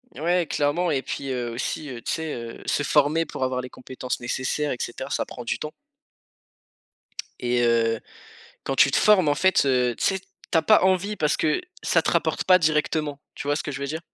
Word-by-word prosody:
Ouais 170 +2 +1
clairement 150 +6 0
et 135 -3 +1
puis, 135 0 -5
heu, 120 -2 -2
aussi, 135 +5 -4 0.2
tu - - -1
sais? 160 -2 -3
Heu, 115 -1 -7
se 145 - 0
former 150 +3 +3
pour 135 - -5
avoir 130 0 0
les 125 - -8
compétences 125 0 -6
nécessaires 130 +4 -1
et 125 - -3
cetera, 130 +3 -5
ça 140 - -1
prend 125 - -9
du 115 - -2
temps. 155 - -5 1.7
Et 120 0 +1
heu, 115 -1 +2 0.6
quand 135 - -2
tu 140 - +5
te - - +2
formes, 195 -7 +5
en 145 - +3
fait, 190 -3 +3
heu, 125 -2 +2
tu - - -4
sais? 195 -1 +1 0.3
Tu 165 - +4
as - - +4
pas 215 +4 +5
envie 190 +2 +2
parce 150 -4 +1
que 155 - +1 0.2
ça - - +3
te - - 0
rapporte - - 0
pas 185 -1 +6
directement, 150 -2 0
tu - - -7
vois 145 - +2
ce - - -2
que 145 - -5
je 135 - -6
veux 140 - -2
dire? 160 +3 -3
145 Hz, 215 wpm, -24 LUFS, 125-160 Hz, 1.7 s, pas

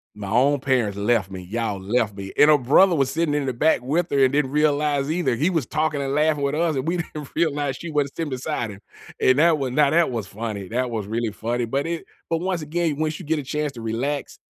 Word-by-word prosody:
"My 100 -2 -6
own 135 +6 +3
parents 125 -7 0
left 100 -2 +1
me. 95 -1 -6
Y'all 105 +1 -3
left 105 0 0
me," 95 -1 -7
and 150 - +7
her 150 - +6
brother 165 +8 +4
was 135 -3 +1
sitting 160 0 0
in 145 -2 0
the 130 - -1
back 155 +2 +2
with 160 +7 0
her 140 -1 +3
and 130 - +4
didn't 140 -2 +1
realize 150 -1 +1
either. 170 -7 0
He 155 +9 +1
was 160 -8 0
talking 155 +1 -1
and 135 0 -2
laughing 150 -1 +2
with 140 +1 0
us, 165 -1 +1
and 135 +4 -2
we 180 - 0
didn't 155 -4 -6
realize 145 -4 0
she 170 - -7
wasn't 145 -2 -1
sitting 165 -2 -3
beside 125 -3 -3
him, 100 - -11 0.4
and 130 +2 +4
that 165 0 +5
was 135 -3 -2
now 145 +1 +4
that 165 -1 +3
was 115 -5 -3
funny. 100 -2 -5
That 125 +3 -2
was 110 -3 -3
really 115 0 -2
funny, 115 +3 -2
but 140 +6 -2
it 170 -1 -4 0.2
but 165 - +1
once 180 -1 -2
again, 155 0 -1
once 155 0 -1
you - - -9
get 155 +1 0
a 145 - -5
chance 150 +1 -2
to 115 - -9
relax 125 +6 -3
140 Hz, 250 wpm, -23 LUFS, 115-155 Hz, 0.4 s, and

